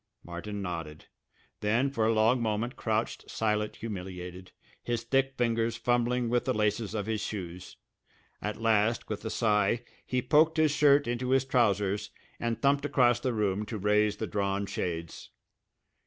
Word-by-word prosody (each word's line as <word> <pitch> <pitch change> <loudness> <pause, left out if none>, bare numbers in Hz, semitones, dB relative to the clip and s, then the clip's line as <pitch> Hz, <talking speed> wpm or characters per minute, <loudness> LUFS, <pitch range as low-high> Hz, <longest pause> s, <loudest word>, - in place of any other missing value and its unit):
Martin 100 +4 -6
nodded, 80 -4 -5 0.5
then 120 +6 +1
for 115 -5 +1
a - - +4
long 115 +3 +3
moment 115 +3 -1
crouched 110 -1 -2
silent 105 -1 -1
humiliated, 90 -3 -7 0.3
his 120 -1 -2
thick 135 0 +1
fingers 115 -1 +1
fumbling 120 0 +1
with 120 +1 +1
the - - 0
laces 105 0 0
of 105 -2 -2
his 110 -1 -2
shoes. 90 -3 -6 0.6
At 105 0 -4
last, 115 0 +2
with 110 - -4
a - - -1
sigh, 110 +1 +1 0.2
he 125 - -1
poked 155 +5 +4
his 155 -1 +4
shirt 145 -1 +5
into 120 +1 -2
his 135 0 +3
trousers 105 -6 +1 0.3
and 115 -1 -2
thumped 140 0 +2
across 125 -4 +3
the 130 - -1
room 105 -3 0
to 110 - -4
raise 105 +1 +2
the - - -2
drawn 100 -1 -1
shades. 85 -4 -4
110 Hz, 155 wpm, -29 LUFS, 100-120 Hz, 0.6 s, shirt